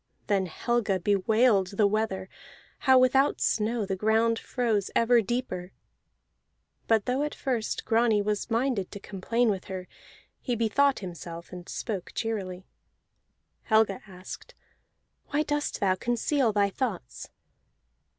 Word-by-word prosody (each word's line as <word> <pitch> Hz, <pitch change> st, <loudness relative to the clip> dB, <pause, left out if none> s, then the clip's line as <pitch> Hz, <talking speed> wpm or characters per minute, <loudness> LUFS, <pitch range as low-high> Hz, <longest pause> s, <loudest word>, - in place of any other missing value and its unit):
Then 195 Hz, -3 st, +1 dB
Helga 210 Hz, +2 st, 0 dB
bewailed 200 Hz, +1 st, +2 dB
the 210 Hz, -, +5 dB
weather, 200 Hz, -2 st, 0 dB, 0.6 s
how 260 Hz, -, +8 dB
without 265 Hz, +2 st, +4 dB
snow 220 Hz, 0 st, +1 dB
the 195 Hz, 0 st, -2 dB
ground 225 Hz, +3 st, +2 dB
froze 225 Hz, -6 st, -1 dB
ever 235 Hz, 0 st, +5 dB
deeper: 190 Hz, -5 st, -3 dB, 1.1 s
but 220 Hz, -3 st, +3 dB
though 255 Hz, +3 st, 0 dB
at 295 Hz, 0 st, -2 dB
first 245 Hz, -5 st, -2 dB
Grani 225 Hz, -2 st, +3 dB
was 210 Hz, 0 st, -1 dB
minded 230 Hz, -4 st, 0 dB
to 205 Hz, -, -8 dB
complain 215 Hz, +4 st, 0 dB
with 190 Hz, -2 st, -4 dB
her, 185 Hz, -1 st, -6 dB, 0.5 s
he 245 Hz, -, -2 dB
bethought 260 Hz, +5 st, +2 dB
himself 170 Hz, -2 st, -8 dB
and 180 Hz, -1 st, -9 dB
spoke 195 Hz, -6 st, -4 dB
cheerily. 195 Hz, -5 st, -3 dB, 1.0 s
Helga 220 Hz, -3 st, +3 dB
asked: 190 Hz, -, -10 dB, 0.7 s
"Why 295 Hz, +1 st, +1 dB
dost 295 Hz, -1 st, -2 dB
thou 190 Hz, -2 st, +3 dB
conceal 240 Hz, +4 st, +1 dB
thy 200 Hz, -1 st, +2 dB
thoughts?" 195 Hz, -, -4 dB
215 Hz, 125 wpm, -28 LUFS, 190-240 Hz, 1.1 s, how